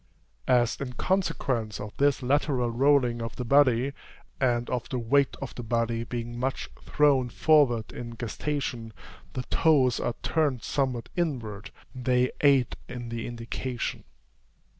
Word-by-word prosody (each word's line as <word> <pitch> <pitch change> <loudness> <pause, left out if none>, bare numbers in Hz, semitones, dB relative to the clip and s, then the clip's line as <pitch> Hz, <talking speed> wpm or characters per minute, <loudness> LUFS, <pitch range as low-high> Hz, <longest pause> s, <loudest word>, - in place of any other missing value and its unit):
As 120 0 +2
in 125 -2 -4
consequence 125 - -1
of 105 0 -7
this 140 -1 +2
lateral 130 -2 +1
rolling 125 -1 +3
of 115 0 -5
the 125 - -4
body, 135 0 +4 0.5
and 120 -2 +1
of 125 -2 -3
the 130 - -2
weight 130 +3 +2
of 135 - -6
the - - -6
body 115 0 -1
being 120 0 -5
much 135 +2 -2
thrown 140 -4 +2
forward 125 -7 +3
in 120 -1 -7
gestation, 120 -1 -3 0.4
the 125 - -3
toes 130 -4 +3
are 120 - -2
turned 130 -2 0
somewhat 130 -4 -1
inward, 115 - -3 0.2
they 125 -1 +1
aid 140 -4 +4
in 120 -1 -6
the 115 0 -4
indication. 120 +1 -4
125 Hz, 140 wpm, -27 LUFS, 115-140 Hz, 0.5 s, body